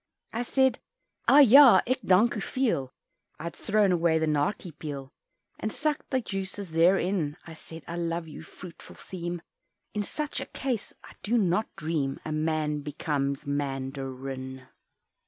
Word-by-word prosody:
I 230 - -1
said 265 0 +2 0.5
"ah! 290 - +8
ja, 275 0 +9
ik 255 +2 0
dank 195 +5 +4
u - - -2
veel," 205 - -1 0.5
I'd 170 +1 -5
thrown 210 -2 +2
away 170 -2 +3
the 160 - +1
"nartje" 155 +5 -1
peel 140 -3 -6 0.5
And 215 - -2
sucked 300 +4 -2
the 260 - +1
juices 195 -4 -5
there 170 +4 +5
in; 175 -6 -1
I 165 - -9
said 160 0 -11
"I 170 - -5
love 170 -1 -2
you," 150 - -9
fruitful 170 +2 -12
theme, 175 -2 -6 0.5
In 210 - -1
such 300 +8 -4
a - - -5
case 255 -6 -3
(I - - -13
do 235 +4 +1
not 195 0 +1
dream) 150 -4 -2
A 155 - -3
man 155 -1 0
becomes 140 -1 -2
Man 135 -2 -2
darin. 130 -1 -6
170 Hz, 155 wpm, -28 LUFS, 150-210 Hz, 0.5 s, ja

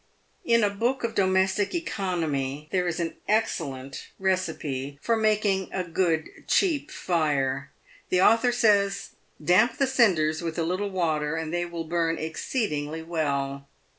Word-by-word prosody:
In 235 -7 +3
a 205 - +3
book 240 +6 -1
of 230 -1 -1
domestic 190 - +2
economy 155 - -2
there 180 -1 +1
is 175 -1 -2
an 170 -1 -3
excellent 140 -11 -1
receipt 160 -8 -2
for 230 +8 +1
making 210 -3 +1
a 185 - -2
good, 165 -2 0 0.2
cheap 330 -7 +2
fire. 145 -5 0 0.4
The 180 - +2
author 230 +3 +5
says, 205 -4 +2 0.2
" 150 - -19
Damp 230 +7 +4
the 275 - +3
cinders 180 -12 +3
with 165 -1 -4
a 165 - +1
little 185 +5 -1
water, 160 -5 0
and 160 0 -4
they 175 0 0
will 170 -1 -5
burn 165 0 0
exceedingly 160 - -3
well." 140 -4 -2
175 Hz, 145 wpm, -26 LUFS, 155-205 Hz, 0.4 s, author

